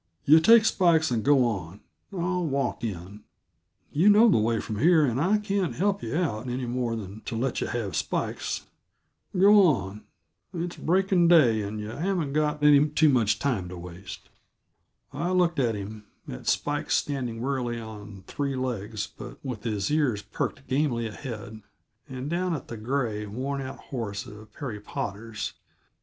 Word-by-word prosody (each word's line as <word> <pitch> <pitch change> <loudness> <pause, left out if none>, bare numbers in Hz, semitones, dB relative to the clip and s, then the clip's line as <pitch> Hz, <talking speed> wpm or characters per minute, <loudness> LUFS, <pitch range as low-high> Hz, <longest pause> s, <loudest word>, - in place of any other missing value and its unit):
Yuh 155 +3 +8
take 225 +6 +7
Spikes 165 -7 +3
and 115 -3 0
go 140 -3 +4
on; 95 -5 -3 0.3
I'll 180 -1 -1
walk 140 -6 -1
in. 100 -1 -5 0.7
Yuh 170 +8 +5
know 215 +3 +7
the 180 - +4
way 115 +1 +1
from 105 -2 -5
here, 160 +1 +5
and 125 0 0
I 195 +6 +3
can't 200 -3 -1
help 200 +2 0
yuh - - -3
out 130 -9 -1
any 125 +1 -2
more 120 -1 -1
than 105 0 -7
to - - -4
let 125 +2 -1
yuh - - -1
have 110 -5 -3
Spikes. - - -2 0.7
Go 205 +2 +7
on 105 - +1 0.5
it's 175 +1 -3
breaking 185 0 +2
day, 130 -11 +5
and 105 +1 -4
yuh 105 +1 -5
haven't 170 -4 -1
got 150 0 0
any 150 0 +6
too 150 +1 +4
much 110 -6 +2
time 105 -8 -1
to 90 - -8
waste." 90 +2 -10 0.8
I 175 - -2
looked 175 -3 +2
at 120 -4 +1
him, 105 +1 -7 0.2
at 60 - -8
Spikes 145 0 0
standing 125 -5 -2
wearily 125 -2 -2
on 105 -3 -10
three 140 +4 -3
legs 110 -5 -3
but - - -11
with 120 -5 -5
his 105 0 -1
ears 140 -9 +1
perked - - -4
gamily 130 -4 0
ahead, 110 -2 -7 0.5
and 130 +1 -5
down 175 +2 -1
at 145 - -8
the 115 - -6
gray, 110 -3 -2
worn 135 +6 -3
out 130 0 -6
horse 110 -5 -5
of 105 0 -12
Perry 115 -3 -6
Potter's. 105 +2 -5
125 Hz, 170 wpm, -26 LUFS, 110-155 Hz, 0.8 s, Yuh